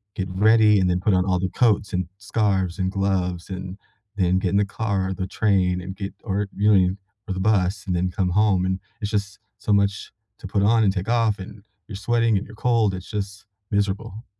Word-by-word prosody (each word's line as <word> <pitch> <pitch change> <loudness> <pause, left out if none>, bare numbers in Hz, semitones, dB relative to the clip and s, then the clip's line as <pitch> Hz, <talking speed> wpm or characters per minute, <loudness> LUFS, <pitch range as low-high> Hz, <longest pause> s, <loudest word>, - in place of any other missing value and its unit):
get 95 - -2
ready 105 +2 +4
and 90 -1 +2
then 90 0 +1
put 100 +2 +1
on 90 0 +2
all 90 -2 +1
the 95 +1 -1
coats 105 -3 +1
and 90 -1 -1
scarves 100 -4 0
and 95 -1 -1
gloves 95 -3 -1
and 95 0 -6 0.4
then 95 -1 +2
get 95 - 0
in 100 - +1
the 100 - +3
car 100 -2 -2
or 95 - -2
the 95 0 -3
train 95 -2 +1
and 95 +1 -7
get 100 -1 -5
or, 100 -1 -1
you 105 +1 +4
know, 90 0 +2 0.3
or - - 0
the 95 - -4
bus 95 -1 +1
and 90 - 0
then 90 +1 0
come 90 0 0
home, 100 -1 +3
and 95 0 -1 0.2
it's 105 -1 -3
just 100 -1 -2 0.2
so 105 - -2
much 100 0 +1 0.3
to - - -8
put 100 +1 0
on 110 +2 +4
and 100 - +4
take 95 +1 -4
off, 115 -3 +2
and 100 +2 -10 0.2
you're 105 - -7
sweating 115 +1 +1
and 95 - -3
you're 110 - -13
cold, 115 -3 +2
it's 90 0 -7
just 100 -1 -5 0.2
miserable. 105 +3 -2
100 Hz, 225 wpm, -23 LUFS, 95-105 Hz, 0.4 s, ready